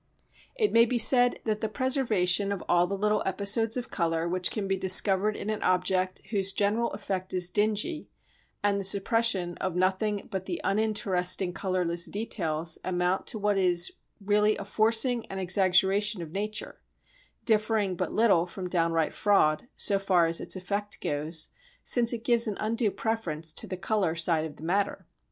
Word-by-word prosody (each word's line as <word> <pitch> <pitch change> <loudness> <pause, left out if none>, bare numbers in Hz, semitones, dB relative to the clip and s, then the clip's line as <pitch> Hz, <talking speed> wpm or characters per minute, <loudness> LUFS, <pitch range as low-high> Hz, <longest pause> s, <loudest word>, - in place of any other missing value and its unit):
It 440 -4 0
may 230 0 +6
be 240 +1 -1
said 245 +2 +5
that 215 -1 -2
the 220 - -2
preservation 215 -7 +1
of 200 - -4
all 175 0 +3
the 200 +2 -4
little 210 +1 0
episodes 205 +4 +1
of 250 0 -6
colour 165 -2 -1
which 180 +1 +1
can 205 -3 -4
be 195 - 0
discovered 190 +2 +3
in 215 - -4
an 215 - -4
object 185 0 0
whose 195 -2 +1
general 210 +4 0
effect 190 -2 -4
is 180 -1 +1
dingy 215 - -1 0.5
and 200 -1 +1
the - - -6
suppression 195 -2 +1
of 185 -2 -3
nothing 190 +3 -1
but 190 -2 -5
the 345 - -3
uninteresting 195 -4 +1
colourless 180 -3 -1
details 165 -7 -2
amount 180 +1 -1
to - - -3
what 205 -1 0
is 175 -2 +4 0.3
really 210 +1 +1
a 200 - -7
forcing 225 +3 +2
and 195 - -6
exaggeration 190 +2 +2
of 155 - -10
nature, 210 +4 -5 0.6
differing 215 -3 +1
but - - -3
little 195 -7 +2
from 185 +1 -7
downright 165 -2 0
fraud, 195 -3 +1
so 200 -1 +2
far 185 -3 +2
as 165 0 +2
its - - -1
effect 200 +3 -4
goes, 155 +2 -3 0.3
since 235 -2 +2
it 230 -2 -5
gives 235 -1 +3
an 210 - -3
undue 225 +1 0
preference 170 -9 -3
to - - -3
the 185 - -5
colour 195 -3 -1
side 165 -1 +1
of 155 - -9
the - - -14
matter. 195 +4 -1
195 Hz, 170 wpm, -27 LUFS, 180-215 Hz, 0.6 s, may